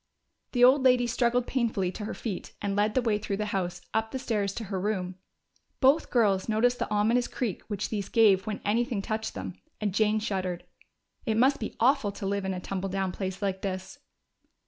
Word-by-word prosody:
The 245 -1 +3
old 260 +3 +7
lady 250 -2 +4
struggled 240 0 +1
painfully 225 -9 0
to 210 +3 -6
her 220 - -4
feet 205 -6 -5
and 200 -1 -2
led 210 +1 +1
the 255 - +2
way 215 -3 +1
through 200 -1 -3
the 210 - -1
house, 180 -2 -2
up 220 0 0
the 265 - -4
stairs 215 -6 -1
to 230 - -4
her 195 -2 -3
room. 190 -3 -1 0.7
Both 275 +4 +4
girls 205 -6 +2
noticed 245 +3 +2
the - - -2
ominous 225 +4 +2
creak 230 -9 -3
which 205 -2 -3
these 205 -3 -3
gave 200 -4 +4
when 210 - -3
anything 230 0 0
touched 220 +1 -3
them, 95 -1 -5 0.3
and 205 -3 -1
Jane 215 +1 +3
shuddered. 190 -5 -3 0.6
It 220 -1 +1
must 265 +4 +4
be 220 - -5
awful 245 -3 +3
to 195 - -6
live 200 0 -1
in 190 - -1
a - - -4
tumble 195 +1 -3
down 190 0 -1
place 190 +1 -4
like 190 -1 -1
this! 190 +8 -5
210 Hz, 205 wpm, -28 LUFS, 195-235 Hz, 0.7 s, old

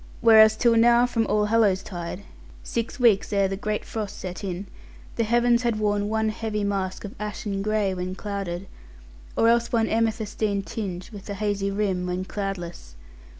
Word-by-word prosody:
Whereas 220 -1 +7
till 235 0 +4
now 235 +1 +6
from 230 -3 0
Allhallows 210 -2 +2
tide, 175 +1 -6 0.4
six 230 +3 -3
weeks 225 -5 +4
ere 200 -1 +3
the 195 - -3
great 210 +2 -3
frost 215 -3 -5
set 185 +2 -6
in, 190 0 -4 0.5
the 230 - +1
heavens 240 +1 +3
had 235 -3 0
worn 205 -1 0
one 220 0 +1
heavy 215 -1 -3
mask 195 -1 -2
of 205 - -7
ashen 210 -1 -3
gray 210 -2 0
when 185 0 -4
clouded, 195 -3 -4 0.7
or 225 - +4
else 235 0 +3
one 225 -2 +2
amethystine 220 -2 0
tinge 190 -2 -5
with 205 -1 -10
a 200 - -3
hazy 200 -1 -1
rim, 195 -3 -1
when 180 +1 -2
cloudless. 175 - -5
210 Hz, 165 wpm, -25 LUFS, 195-220 Hz, 0.7 s, Whereas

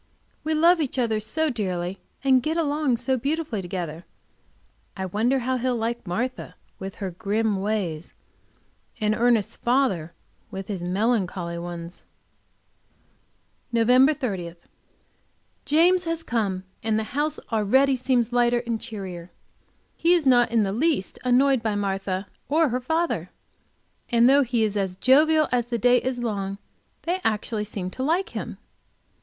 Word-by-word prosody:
We 315 0 0
love 335 +2 +5
each 275 -2 -2
other 225 -4 +1
so 295 +9 -1
dearly, 185 -5 -3 0.2
and 260 -2 +4
get 315 +6 -1
along 295 -5 +1
so 260 +2 0
beautifully 280 -4 -2
together 175 -3 -5 0.9
I 190 - -2
wonder 220 +8 +1
how 255 +1 0
he'll 250 0 0
like 230 -1 -3
Martha 245 +9 -3 0.2
with 195 0 -6
her 195 -3 -4
grim 210 +2 -1
ways, 190 -6 -3 0.8
and 215 0 +1
Ernest's 230 -2 +2
father 235 - 0 0.3
with 195 +1 -7
his 195 -4 -3
melancholy 180 -3 -1
ones. 170 0 -7 1.7
Nov. 250 +5 +4
30. 190 - -4 1.1
James 350 +4 +4
has 330 0 -2
come, 200 -8 -1 0.2
and 220 0 0
the 220 - 0
house 295 +2 -1
already 260 +6 +3
seems 245 -2 0
lighter 240 0 +2
and 230 -2 -2
cheerier. 190 -6 -7 0.7
He 345 +2 +4
is 335 -4 0
not 245 -3 +4
in 230 -2 +3
the 195 -1 -1
least 285 - 0
annoyed 255 +1 +3
by 220 -2 -1
Martha 195 -1 -2 0.2
or 315 +1 +3
her 250 +2 -1
father, 320 +6 -1 0.8
and 235 0 +5
though 280 +2 +6
he 240 -3 +1
is 210 -1 0
as 190 -3 -1
jovial 305 +7 +4
as 240 -2 +1
the 240 -1 -1
day 245 +2 +4
is 255 0 -2
long, 200 -5 -3 0.5
they 360 +2 -1
actually 215 0 -1
seem 190 -3 -5
to 260 - -7
like 345 +9 +1
him. - - -6
235 Hz, 145 wpm, -24 LUFS, 195-270 Hz, 1.7 s, though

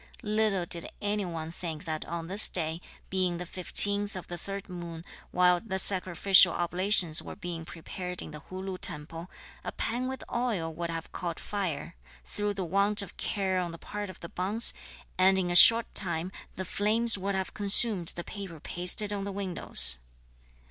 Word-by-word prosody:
Little 210 -4 0
did 170 0 -1
any 205 0 -2
one 165 -2 -6
think 165 -1 -7
that 155 -2 -4
on 170 -1 -6
this 195 +5 +1
day, 165 -1 -3 0.3
being 185 -2 0
the 180 - -6
15th 200 +3 +1
of 185 - -7
the 175 - -5
3rd 195 +3 -7
moon, 170 -2 -8 0.2
while 180 0 +3
the 190 -1 -4
sacrificial 185 -1 +4
oblations 175 -1 +3
were - - -9
being 175 -5 -7
prepared 180 +1 -7
in - - -5
the 150 - -9
Hu 185 +4 -9
Lu 190 -1 -6
temple, 165 +4 -2 0.3
a - - -5
pan 245 +2 -3
with 265 0 -6
oil 210 -10 -2
would 170 +1 -5
have 165 0 -6
caught 170 -2 -5
fire, 185 - -5 0.3
through 205 0 -3
the 190 -2 -4
want 200 +4 +1
of 190 - -12
care 190 -3 -1
on 175 -2 -3
the 165 - -9
part 205 +3 -7
of 185 - -12
the 170 - -8
bonze, 205 +6 +1 0.5
and 190 +1 +4
that - - +2
in 175 -1 -3
a - - -1
short 230 +5 +7
time 175 -2 0 0.2
the 190 - -5
flames 220 +5 +2
would 195 0 -3
have 190 -1 -4
consumed 200 -3 +2
the 175 - -6
paper 195 -6 -9
pasted 180 +6 +4
on 200 -1 -4
the 200 - -5
windows. 175 - +6
185 Hz, 185 wpm, -28 LUFS, 170-200 Hz, 0.5 s, short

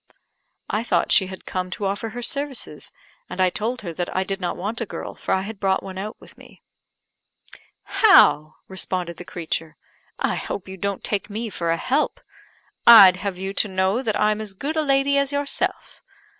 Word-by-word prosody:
I 215 - -1
thought 235 - +1
she 190 - +5
had 190 0 -10
come 185 0 -3
to 205 - -3
offer 200 +3 -2
her 245 +2 -7
services; 280 -1 -2 0.4
and - - -7
I 185 -1 +3
told 230 +6 -3
her 175 -5 -6
that 175 +1 -4
I 185 - +2
did 195 0 -4
not 175 - -2
want 215 +6 -4
a - - -1
girl, - - -6
for - - -5
I 190 - +2
had 210 0 -7
brought 190 -1 +1
one 190 -1 -7
out 210 +3 -6
with - - -17
me. - - -17 1.2
"How!" 155 - +5
responded 185 -2 -3
the - - -8
creature, 165 -2 -4 0.4
"I - - 0
hope 190 - -5
you 190 - -7
don't 200 +1 -3
take 205 0 -2
me 220 +2 -4
for 170 -2 -3
a 165 - +2
help. 270 - 0 0.7
I'd 195 -6 +10
have 185 0 -4
you 190 +1 -4
to 210 - +1
know 190 +4 0
that 220 -5 -1
I'm 215 0 +2
as 205 -3 -7
good 290 +10 -4
a 315 - +2
lady 280 -1 +2
as 280 0 0
yourself. 285 0 -2
200 Hz, 200 wpm, -23 LUFS, 185-235 Hz, 1.2 s, I'd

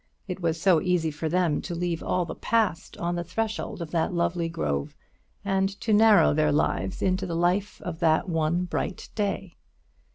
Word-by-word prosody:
It 185 -1 -4
was 165 -1 0
so 170 -3 +4
easy 175 -3 +1
for 155 +2 -3
them 175 -3 +1
to 175 - -5
leave 170 -1 -2
all 180 -1 0
the - - -5
Past 220 -7 -1
on 175 0 -2
the 175 - -2
threshold 220 -1 -3
of 155 - -9
that 165 -2 0
lovely 170 -1 0
grove, 70 - -2 0.5
and 195 -1 +1
to 220 - 0
narrow 215 -4 +6
their 150 0 +2
lives 150 +5 0
into 190 0 +1
the 170 - -3
life 180 +4 0
of 165 -2 -5
that 160 +2 +2
one 165 +1 0
bright 180 +1 -4
day. 195 -3 -3
175 Hz, 185 wpm, -26 LUFS, 165-190 Hz, 0.5 s, narrow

